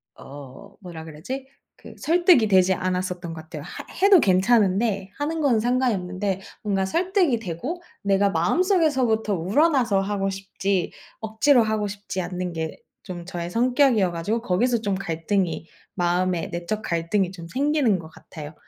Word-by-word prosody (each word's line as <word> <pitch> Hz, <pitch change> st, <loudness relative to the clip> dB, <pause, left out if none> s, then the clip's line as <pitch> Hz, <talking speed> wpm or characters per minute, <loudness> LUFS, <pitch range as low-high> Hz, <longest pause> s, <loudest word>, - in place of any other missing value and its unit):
어 140 Hz, +7 st, -12 dB
뭐라 170 Hz, -4 st, -9 dB
그러지? 205 Hz, -, -7 dB, 0.3 s
그 -, -, -13 dB
설득이 340 Hz, -, +4 dB
되지 190 Hz, -2 st, +4 dB
않았었던 180 Hz, -2 st, -3 dB
것 160 Hz, -, -8 dB
같아요. 155 Hz, -2 st, -9 dB
하 175 Hz, -, -8 dB, 0.2 s
해도 395 Hz, -2 st, +8 dB
괜찮은데 195 Hz, -1 st, +2 dB
하는 310 Hz, +3 st, -2 dB
건 260 Hz, -7 st, +3 dB
상관이 245 Hz, +1 st, +1 dB
없는데 185 Hz, +1 st, -3 dB, 0.2 s
뭔가 195 Hz, -2 st, 0 dB
설득이 345 Hz, -, +1 dB
되고 225 Hz, -, -5 dB, 0.2 s
내가 200 Hz, 0 st, +3 dB
마음속에서부터 255 Hz, -, +2 dB
우러나서 220 Hz, -, +2 dB
하고 195 Hz, 0 st, -1 dB
싶지 195 Hz, -1 st, -2 dB, 0.3 s
억지로 225 Hz, +4 st, +3 dB
하고 215 Hz, -1 st, -1 dB
싶지 200 Hz, -1 st, -5 dB
않는 180 Hz, 0 st, -4 dB
게 160 Hz, -1 st, -4 dB, 0.3 s
좀 175 Hz, -2 st, -7 dB
저의 175 Hz, -1 st, -5 dB
성격이어 245 Hz, -3 st, +3 dB
가지고 205 Hz, +8 st, -2 dB
거기서 235 Hz, +4 st, +1 dB
좀 205 Hz, -3 st, -1 dB
갈등이 170 Hz, -1 st, -2 dB, 0.3 s
마음에 180 Hz, -1 st, 0 dB
내적 175 Hz, +5 st, -3 dB
갈등이 175 Hz, +2 st, 0 dB
좀 170 Hz, -3 st, -10 dB
생기는 270 Hz, -, +1 dB
것 165 Hz, -, -10 dB
같아요. 155 Hz, -1 st, -11 dB
195 Hz, 330 characters per minute, -24 LUFS, 175-240 Hz, 0.3 s, 해도